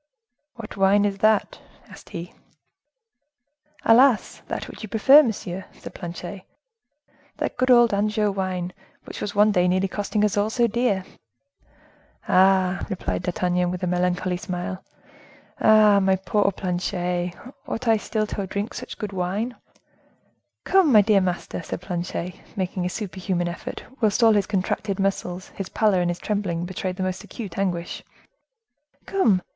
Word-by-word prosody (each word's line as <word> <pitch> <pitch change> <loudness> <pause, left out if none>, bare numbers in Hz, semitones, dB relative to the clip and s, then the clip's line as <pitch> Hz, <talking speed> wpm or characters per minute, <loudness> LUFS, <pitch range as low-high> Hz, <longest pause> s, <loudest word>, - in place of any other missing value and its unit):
"What 225 -3 -9
wine 200 +1 +4
is 200 -1 -2
that?" 215 0 +2 0.3
asked - - -14
he. 170 +1 -7 1.5
"Alas! 240 0 +4
that - - -4
which - - -11
you 215 - -7
prefer, 265 +8 +7
monsieur," 190 -7 -4
said - - -11
Planchet; 175 +2 -7 1.0
"that - - -2
good 255 +1 0
old 240 -3 +6
Anjou 210 +1 +1
wine, 185 -2 -3 0.3
which - - -8
was 205 - -4
one 210 +1 +5
day 180 -2 +3
nearly 185 +2 +2
costing 205 +2 -1
us 210 - 0
all 205 +1 +2
so 240 +1 +2
dear." 230 -4 0 1.2
"Ah!" 190 0 +3
replied 190 -4 -3
D'Artagnan, 180 0 0
with 180 +1 -4
a - - +2
melancholy 180 0 0
smile, 185 +1 -5 0.8
"Ah! 215 -2 +6
my 190 -1 +3
poor 200 +1 +1
Planchet, 180 -1 -2 0.3
ought 245 +2 -4
I 225 -1 +5
still 215 0 -2
to 200 -2 -4
drink 200 +3 -3 0.2
good 210 -3 -5
wine?" 195 +7 -2 1.1
"Come! 375 -6 +4
my 215 -3 +8
dear 205 -1 +3
master," 180 -1 -3
said 165 - -5
Planchet, 180 0 -4 0.2
making 185 -2 -2
a - - -2
super 190 -2 -6
human 180 -2 -1
effort, 170 - -6 0.2
whilst 215 +1 +2
all 225 -1 +7
his 205 -2 +1
contracted 195 0 -2
muscles, 185 -2 -2
his 195 - -7
pallor 210 -5 +2
and 175 - 0
his 175 - -2
trembling 180 -6 -2
betrayed 185 0 -4
the 185 - -3
most 185 0 -3
acute 200 -6 -7
anguish. 175 -3 -2 1.0
"Come! 220 - +2
195 Hz, 150 wpm, -24 LUFS, 180-215 Hz, 1.5 s, my